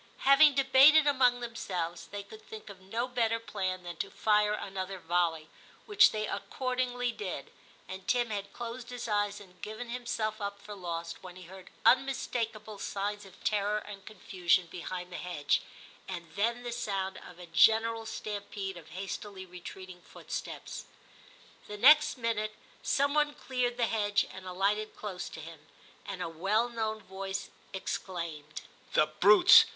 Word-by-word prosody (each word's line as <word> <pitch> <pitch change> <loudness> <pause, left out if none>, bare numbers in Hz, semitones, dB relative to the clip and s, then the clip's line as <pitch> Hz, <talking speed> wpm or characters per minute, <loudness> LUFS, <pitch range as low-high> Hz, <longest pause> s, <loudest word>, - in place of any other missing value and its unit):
Having 275 +1 +7
debated 275 +3 +7
among 255 -4 +4
themselves, 180 -8 -4
they 200 0 -6
could 215 +2 -13
think 215 -1 -10
of 190 -1 -14
no 225 +6 -2
better 230 -2 +1
plan 190 -4 -3
than 175 -1 -7
to - - -3
fire 210 -1 +3
another 195 -2 -4
volley, 170 -2 0 0.4
which 415 +1 +7
they 215 0 -1
accordingly 250 -1 -1
did, 185 -10 -6 0.4
and 190 0 -8
Tim 240 -2 +2
had 200 -1 -4
closed 235 0 -6
his 245 -1 -5
eyes 205 -1 0
and 180 -3 -16
given 220 +3 -6
him 245 0 -5
self 215 -2 -1
up 200 0 -4
for 210 +1 -9
lost 170 -3 -5
when 180 -1 -10
he 185 - -11
heard 185 +1 -12 0.2
unmistakable 230 -5 +1
signs 205 +1 -3
of 190 - -17
terror 210 0 +1
and 205 -2 -8
confusion 185 -3 +1
behind 180 0 -6
the 180 - -5
hedge, 170 -5 0 0.5
and 175 -3 -6
then 235 +4 0
the 240 - -4
sound 195 -5 -2
of 180 - -13
a 180 - -9
general 225 +6 +4
stampede 200 -3 -5
of 165 -2 -12
hastily 190 +1 -6
retreating 180 0 -10
footsteps. - - -7 0.8
The 210 - -6
next 295 +6 +7
minute 220 -3 -1 0.3
some 280 +1 +2
one 295 -1 +2
cleared 245 -2 -1
the 240 - +3
hedge 205 -2 +1
and 190 0 -9
alighted 200 +4 0
close 190 -4 -5
to 160 - -8
him, 155 -1 -11 0.4
and 190 -3 -4
a - - -2
well 200 +9 +1
known 220 -2 -3
voice 195 +1 -5 0.2
exclaimed, 165 -6 -5 0.3
'The 155 - +5
brutes! 210 - +8
205 Hz, 155 wpm, -31 LUFS, 185-235 Hz, 0.8 s, brutes